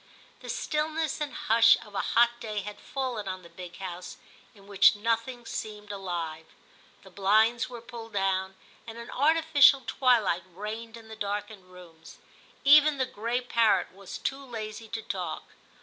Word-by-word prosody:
The - - -10
stillness 310 0 -2
and 295 -1 -2
hush 230 -7 +5
of 210 - -15
a - - -2
hot 240 0 +2
day 215 -3 -4
had 205 +1 -8
fallen 250 -7 -4
on 185 -1 -5
the 170 - -13
big 175 0 -10
house, 180 -2 -7 0.4
in 200 -1 -18
which 200 +1 +5
nothing 230 +3 -2
seemed 210 -2 -6
alive. 170 -5 -5 0.6
The 190 - -15
blinds 220 +6 +2
were 240 -2 -8
pulled 230 -2 -10
down, 190 -1 0 0.3
and 225 0 -8
an 235 0 -9
artificial 290 -2 +5
twilight 230 -9 +2
reigned 220 +3 -6
in 225 -1 -14
the 220 - -9
darkened 205 -1 -4
rooms. 170 -3 -14 0.5
Even 300 +1 +7
the 260 - +1
gray 235 +1 -2
parrot 230 -3 +2
was 195 0 -9
too 275 +1 -3
lazy 225 -3 -7
to 225 0 -5
talk. - - -4
220 Hz, 160 wpm, -28 LUFS, 195-245 Hz, 0.6 s, Even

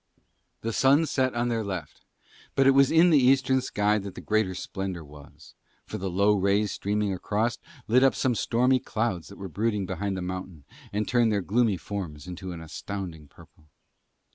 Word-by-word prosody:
The 115 0 -3
sun 140 +7 +4
set 130 -4 0
on 120 +1 0
their 115 -2 -1
left. 95 -7 -6 0.5
But 135 - +4
it 135 - +7
was 135 0 +5
in 170 +2 +5
the 150 - +6
eastern 130 0 +3
sky 105 -3 +1
that 100 -1 -8
the - - -7
greater 110 -4 0
splendour 95 -2 -5
was; 75 -1 -15 0.3
for - - -6
the 95 +1 -3
low 100 +4 +3
rays 100 +1 +1
streaming 105 0 -1
across 110 +6 -1 0.3
lit 125 +4 +4
up 135 - +4
some 130 - +1
stormy 125 +3 +2
clouds 110 -8 -2
that 100 - -12
were 95 - -6
brooding 105 +2 -1
behind 95 +1 -3
the 90 - -4
mountain 90 -4 -6 0.3
and 105 +1 -2
turned 120 -2 +3
their 100 -1 +1
gloomy 105 +1 +1
forms 85 -8 -6
to 95 -1 -6
an 85 -2 -7
astounding 80 -1 -7
purple. 75 +2 -20
105 Hz, 185 wpm, -27 LUFS, 95-120 Hz, 0.5 s, it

